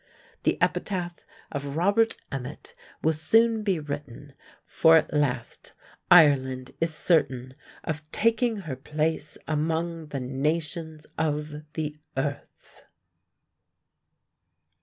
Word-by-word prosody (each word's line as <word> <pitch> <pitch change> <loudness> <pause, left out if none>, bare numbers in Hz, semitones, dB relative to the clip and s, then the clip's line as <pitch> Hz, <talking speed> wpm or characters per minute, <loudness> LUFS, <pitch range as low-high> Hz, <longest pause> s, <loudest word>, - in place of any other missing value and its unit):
The - - +1
epitaph 175 -3 -2 0.2
of 140 -1 -4
Robert 205 +6 +3
Emmet 135 0 -6 0.3
will 160 - +3
soon 225 +9 +3
be 195 -4 +1
written, 145 -2 -7 0.3
for 160 0 +5
at 155 - 0
last 135 -5 -1 0.4
Ireland 135 -6 +5
is 165 0 +2
certain 130 -6 +1 0.3
of 155 -1 -5
"taking 230 -1 +1
her 155 -7 -5
place 155 +3 -2
among 160 +1 -1
the 145 -2 -4
nations 155 +4 -2
of 150 -1 -1 0.2
the 150 -1 -3 0.2
earth." 140 +1 -5
155 Hz, 100 wpm, -26 LUFS, 145-170 Hz, 0.4 s, for